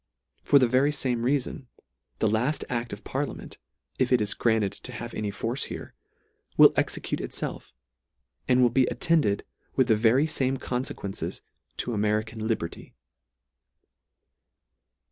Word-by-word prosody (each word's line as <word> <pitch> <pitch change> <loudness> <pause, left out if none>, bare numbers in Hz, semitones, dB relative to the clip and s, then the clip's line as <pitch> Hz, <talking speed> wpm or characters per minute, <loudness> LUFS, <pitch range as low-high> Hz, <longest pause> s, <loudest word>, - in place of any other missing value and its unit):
For 145 - +5
the 130 -3 +5
very 130 +4 +3
fame 130 -5 -1
reafon, 130 0 -1 0.5
the - - +2
laft 120 +8 0
act 120 -1 -2
of 100 +1 -8
parliament, 140 +1 -4 0.4
if 130 -1 +2
it 125 - +5
is 105 -1 -1
granted 110 -4 +1
to - - -7
have 120 0 -7
any 105 -1 -2
force 115 +6 -1
here, - - -8 0.6
will - - +8
execute - - -1
itfelf, - - -4 0.8
and 125 0 +4
will 120 - +4
be 130 +1 +3
attended 155 -12 +1 0.3
with 130 -1 +3
the 110 - +6
very 115 +6 +4
fame 135 -4 0
confequences 125 -6 -4 0.4
to 120 - -2
American 110 +1 -1
Liberty. 95 -7 -4
120 Hz, 135 wpm, -27 LUFS, 110-130 Hz, 0.8 s, will